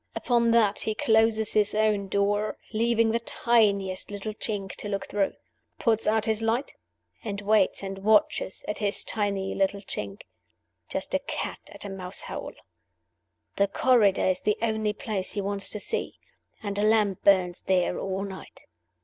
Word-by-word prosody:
Upon 235 -2 +2
that 220 -3 +3
he 220 - -1
closes 220 -1 +2
his 210 -1 +3
own 210 -2 +1
door, 205 +2 0 0.2
leaving 230 0 +2
the 230 - +1
tiniest 205 -6 +1
little 205 +1 -5
chink 205 -3 -4
to 205 - -6
look 200 -1 -3
through; 200 -2 0 0.4
puts 225 -2 +1
out 220 0 +2
his 220 0 0
light; 230 +5 -1 0.5
and 200 -3 -4
waits 205 -1 +2
and 195 0 -5
watches 210 -2 +2
at 210 - -3
his 205 -2 +3
tiny 200 -3 -1
little 195 +1 0
chink, 100 - -6 0.7
like - - -3
a - - +2
cat - - -5
at - - -7
a - - -5
mouse 185 -1 -2
hole. - - -6 1.0
The 200 - +3
corridor 210 -2 +3
is 185 -1 +1
the 210 - 0
only 220 -2 0
place 205 -3 -4
he 205 - -2
wants 200 0 +1
to 210 - -4
see; 455 - 0 0.5
and 205 -1 -3
a - - +1
lamp 210 -3 +2
burns 185 -3 +3
there 180 -1 +1
all 190 0 -3
night. 190 -1 -9
205 Hz, 165 wpm, -26 LUFS, 195-220 Hz, 1.0 s, that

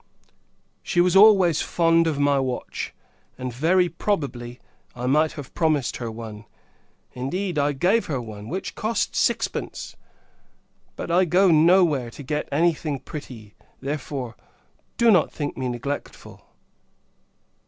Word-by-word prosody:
She 175 - -1
was 180 +1 +3
always 195 -6 +6
fond 165 -1 +2
of 155 -3 -1
my 145 -1 +2
watch; 130 -2 -4 0.5
and, 130 -1 -5
very 175 +8 +3
probably, 140 -9 -3 0.4
I 125 0 -5
might 150 +4 +2
have 145 -4 -9
promised 155 -6 0
her 120 -2 -4
one: 110 -1 -8 0.7
indeed, 170 +7 -2
I 145 +1 +1
gave 185 +11 +1
her 140 -5 -2
one, 110 -2 -8
which 185 +4 -4
cost 225 +2 -2
sixpence! - - -1 1.0
But, - - -5
I 180 +2 +4
go 180 +2 +4
no 170 +4 +6
where 135 -7 -2
to 140 - -10
get 150 +2 -3
any 170 +4 +3
thing 150 -2 -4
pretty; 125 -7 -10 0.3
therefore, 135 -3 -4 0.6
do 235 -1 +5
not 180 -6 +3
think 145 -2 -4
me 130 -1 -3
neglectful. 125 +4 -6
150 Hz, 135 wpm, -24 LUFS, 130-175 Hz, 1.0 s, always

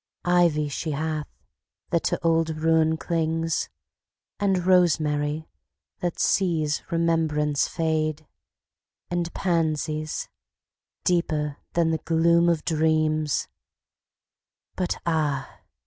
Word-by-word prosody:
Ivy 170 -4 +3
she 155 +2 -3
hath, 155 +1 -2 0.6
that 170 - +1
to - - 0
old 165 -1 +3
ruin 160 0 +3
clings; 165 -1 -1 0.7
And 190 -3 +1
rosemary, 155 -4 +2 0.5
that 175 -1 -2
sees 160 -5 +1
remembrance 160 -3 +1
fade; 155 -2 -1 0.9
And 175 -1 -1
pansies, 155 -3 -1 0.8
deeper 155 -5 0 0.2
than 165 -1 +2
the 160 - 0
gloom 170 +1 +3
of 165 -2 0
dreams; 155 -2 +1 1.3
But 180 -1 -1
ah! 155 -5 -1
160 Hz, 90 wpm, -25 LUFS, 155-170 Hz, 1.3 s, Ivy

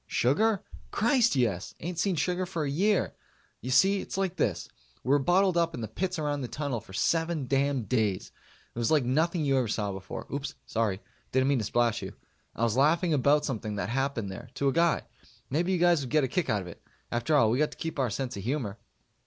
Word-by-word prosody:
Sugar? 195 - +2 0.3
Christ, 235 +1 +3
yes! 110 -8 0
Ain't 170 0 -4
seen 190 0 +1
sugar 180 +3 0
for 170 -4 -2
a 145 - -1
year. 195 +7 +1 0.5
You 125 - -5
see, 190 +9 +4
it's - - -6
like 190 -2 -1
this: 95 - -1 0.4
we - - -5
were 145 +1 +5
bottled 180 +5 +3
up 165 -1 +1
in - - -6
the 110 - -3
pits 180 - -3
around 145 -2 -1
the 125 - -3
Tunnel 140 -4 -3
for 105 - -16
seven 165 - 0
damn 135 0 +1
days. 110 -5 -1 0.4
It - - -6
was 115 - +1
like 150 -5 +3
nothing 160 +5 +1
you 135 -1 +3
ever 125 - 0
saw 105 -1 -1
before. 95 -1 -7
Oops 140 0 -4
sorry. 110 -3 -1 0.3
Didn't 130 +1 +2
mean 140 -3 +2
to - - -2
splash 120 +1 +1
you. - - -7 0.4
I 115 - -2
was 115 -1 +2
laughing 160 +5 +3
about 145 +1 +3
something 110 -5 -3
that 100 -1 -3
happened 125 -5 -1
there 120 +6 -9
to 140 - +1
a - - -1
guy. 170 0 +2 0.5
Maybe 170 +6 +1
you 185 - +2
guys 175 -2 +4
would 130 - -5
get 150 +1 +3
a - - +2
kick 180 +6 -1
out 105 -2 +1
of - - -10
it. 85 - -11 0.3
After 120 +6 +1
all, 115 -6 +5
we 125 - +1
got 150 - +3
to - - -13
keep 160 -3 -4
our 130 -3 +2
sense 130 +4 -3
of 100 - -5
humor. 115 -4 -2
140 Hz, 230 wpm, -28 LUFS, 115-170 Hz, 0.5 s, were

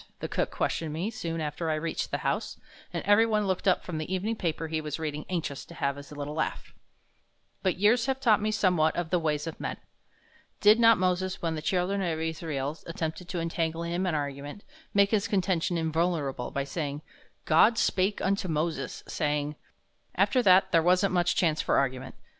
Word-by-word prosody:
the - - -3
cook - - -1
questioned 160 -2 -2
me 175 +8 -2
soon 170 -7 -4
after 155 +2 -3
I 155 - +1
reached 160 +1 -3
the - - -1
house, - - -1 0.3
and - - -3
every 215 +3 +5
one 215 -2 +1
looked 190 0 -1
up 185 - +3
from 165 -4 -4
the 155 +3 -5
evening 200 +5 -1
paper 165 -5 -2
he 160 0 -2
was 150 -2 -4
reading 150 -2 -4
anxious 165 -6 -3
to 170 - -13
have 140 -2 -1
his 140 0 -11
little 145 0 -5
laugh. 160 0 -3 0.9
But 185 -2 0
years 225 +5 +3
have 265 0 0
taught 225 -6 +4
me 215 - 0
somewhat 180 -7 +2
of 175 -2 -3
the 180 - +3
ways 150 -2 -1
of 165 - -6
men. - - -4 0.8
Did 210 +2 +6
not 230 -1 +7
Moses, 185 0 -1
when 165 -1 0
the 155 - -4
children 185 +4 0
of 165 -4 -1
Israel 155 -2 -3
attempted 165 +1 -4
to 180 - -2
entangle 165 0 -2
him 175 +2 -1
in 170 - 0
argument, 145 +4 -5 0.3
make 200 0 +3
his 210 -3 +2
contention 185 -3 0
invulnerable 160 -5 -1
by 140 - -2
stating, 145 0 -4 0.4
"God 215 +9 +5
spake 195 -1 +1
unto 195 0 0
Moses, 155 -4 -2
saying, 150 -1 -1 0.3
" - - -39
After 255 - +3
that 190 -2 +5
there 165 - +5
wasn't 185 +3 +3
much 175 -1 +2
chance 160 -3 +2
for - - +1
argument. 130 -1 -1
170 Hz, 195 wpm, -28 LUFS, 155-190 Hz, 0.9 s, not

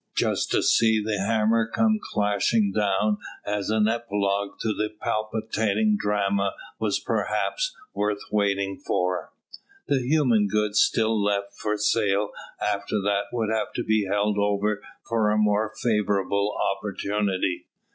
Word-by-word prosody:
Just - - +1
to - - +2
see 110 -1 +4
the 105 -1 -2
hammer 110 +2 +2
come 220 -1 +2
clashing 105 0 +1
down 105 0 +1 0.3
as 105 -1 -2
an 110 -1 +3
epilogue 100 -3 -1
to 110 - -1
the 105 0 -1
palpitating 110 -1 0
drama 100 -1 0 0.2
was - - 0
perhaps - - -1 0.2
worth 105 0 0
waiting 100 -2 0
for. 90 0 -1 0.6
The 140 - +2
human 125 -6 +3
goods 105 +1 +1
still 110 -2 +2
left 100 -1 -1
for 105 0 -2
sale 105 -1 +1 0.3
after 105 +1 -1
that 100 0 +1
would 110 -3 -1
have 110 -1 -1
to 120 - -2
be 110 -2 +1
held 105 +1 +1
over 105 +1 0 0.3
for 110 -2 +2
a 105 - +2
more 105 0 +2
favourable 105 -2 +1 0.2
opportunity. 100 -3 -2
105 Hz, 135 wpm, -25 LUFS, 100-110 Hz, 0.6 s, see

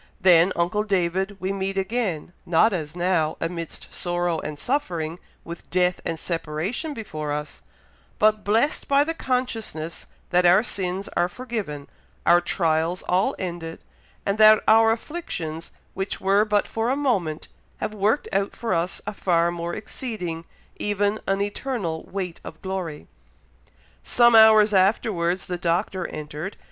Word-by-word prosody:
Then, 180 -1 +6
uncle 180 +5 +1
David, 190 0 0
we 190 +1 -2
meet 195 0 -2
again, 190 -5 -2
not 175 +6 +3
as 155 -3 -4
now, 175 -3 +1
amidst 165 -1 -5
sorrow 175 -2 -1
and 150 -1 -6
suffering, 175 - -2 0.2
with 170 0 -9
death 180 0 +1
and 165 - -3
separation 175 - -3
before 155 -9 -5
us, 150 0 -5 0.6
but 215 0 +3
blessed 225 +8 +1
by 280 +1 +4
the 325 +2 -2
consciousness 230 - -3 0.2
that 180 0 +4
our 180 +4 +6
sins 190 -4 -3
are 175 +1 +2
forgiven, 200 - -5 0.4
our 175 0 +6
trials 165 0 0
all 185 +2 +1
ended, 170 -3 -5 0.4
and 200 +2 0
that 215 0 +7
our 225 0 +6
afflictions 175 - -5 0.2
which 190 +1 -3
were 200 +2 +3
but 210 -1 +1
for 225 +1 -1
a 265 - +2
moment, 200 - -1 0.3
have 215 - -3
worked 215 +7 +1
out 195 +1 0
for 230 -5 -2
us 170 +2 -1
a 210 - -4
far 170 -3 +2
more 170 0 -4
exceeding, 180 -8 -5 0.3
even 205 +1 0
an 195 0 +1
eternal 205 - -3
weight 185 -3 -5
of 160 - -9
glory." 185 -6 -4 1.0
Some 240 -1 +4
hours 220 -1 +7
afterwards 185 -2 +2
the 180 -1 -4
Doctor 175 +1 0
entered. 155 +5 -6
185 Hz, 145 wpm, -24 LUFS, 170-215 Hz, 1.0 s, that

